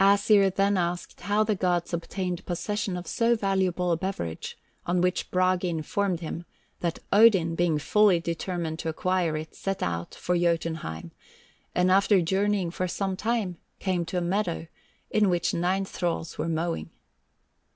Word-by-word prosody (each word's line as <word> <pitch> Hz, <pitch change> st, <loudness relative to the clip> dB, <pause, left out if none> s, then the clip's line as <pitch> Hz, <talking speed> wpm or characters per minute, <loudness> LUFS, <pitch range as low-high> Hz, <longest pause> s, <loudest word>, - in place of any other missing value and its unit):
Æsir 200 Hz, -1 st, +5 dB
then 200 Hz, 0 st, +3 dB
asked 175 Hz, 0 st, -2 dB
how 205 Hz, +3 st, +2 dB
the 215 Hz, 0 st, +1 dB
gods 180 Hz, -3 st, 0 dB
obtained 180 Hz, +1 st, -3 dB
possession 195 Hz, +2 st, -2 dB
of 175 Hz, -, -6 dB
so 235 Hz, 0 st, +2 dB
valuable 190 Hz, -4 st, 0 dB
a 165 Hz, -, +2 dB
beverage, 160 Hz, -, -4 dB, 0.3 s
on 175 Hz, +1 st, +2 dB
which 180 Hz, +1 st, 0 dB
Bragi 185 Hz, 0 st, +2 dB
informed 175 Hz, +3 st, -1 dB
him 165 Hz, +1 st, -5 dB, 0.4 s
that 170 Hz, -2 st, -1 dB, 0.2 s
Odin 200 Hz, -6 st, +6 dB
being 165 Hz, -2 st, +2 dB
fully 200 Hz, +4 st, +4 dB
determined 170 Hz, -1 st, -3 dB
to 165 Hz, -, -2 dB
acquire 175 Hz, -1 st, 0 dB
it, 155 Hz, +1 st, -7 dB
set 195 Hz, 0 st, -3 dB
out 85 Hz, 0 st, -3 dB
for 180 Hz, -, -1 dB
Jotunheim, 165 Hz, -, -1 dB, 0.6 s
and 180 Hz, +1 st, +3 dB
after 200 Hz, +1 st, +5 dB
journeying 190 Hz, +1 st, +1 dB
for 185 Hz, +1 st, -2 dB
some 190 Hz, +1 st, -2 dB
time, 210 Hz, -4 st, -1 dB, 0.2 s
came 185 Hz, -3 st, 0 dB
to 170 Hz, +2 st, -3 dB
a -, -, +1 dB
meadow 175 Hz, -2 st, -1 dB, 0.5 s
in 210 Hz, -2 st, +3 dB
which 175 Hz, -1 st, +1 dB
nine 185 Hz, +3 st, +1 dB
thralls 170 Hz, -3 st, -3 dB
were 165 Hz, -, -2 dB
mowing. 165 Hz, +1 st, -2 dB
180 Hz, 155 wpm, -27 LUFS, 170-195 Hz, 0.6 s, Odin